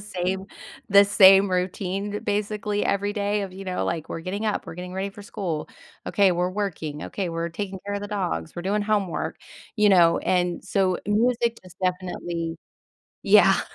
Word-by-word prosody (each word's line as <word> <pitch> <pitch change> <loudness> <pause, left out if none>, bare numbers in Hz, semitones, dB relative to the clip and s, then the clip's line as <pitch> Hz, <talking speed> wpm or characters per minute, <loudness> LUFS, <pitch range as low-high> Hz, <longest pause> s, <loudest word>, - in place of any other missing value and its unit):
same 190 -1 -3 0.4
the 200 0 +7
same 195 -1 +7
routine 190 +3 -2
basically 210 0 -1
every 205 +1 0
day 205 0 -1
of, 195 -2 -6
you 195 +1 -9
know, 185 -1 -2
like, 165 -2 -3
"We're - - -4
getting 195 +5 -4
up, 210 - -2
we're 165 - -7
getting 180 +1 -7
ready 195 +1 -2
for 205 +1 -12
school; 175 -6 -4 0.4
okay, 195 -2 +3
we're 180 +1 0
working, 165 -7 -4
okay, 195 -3 -3
we're 165 0 -2
taking 190 +2 -5
care 205 - -2
of 200 - -3
the 205 - -5
dogs, 180 - -3
we're 175 - -4
doing 205 +3 0
homework," 205 -4 -1 0.4
you 210 -1 +4
know? 170 -3 +5
And 180 -1 0
so, 185 -2 +1
music 235 +2 +1
is 180 -1 -14
definitely 175 -2 -2 0.7
Yeah. - - +6
190 Hz, 175 wpm, -24 LUFS, 180-205 Hz, 0.7 s, the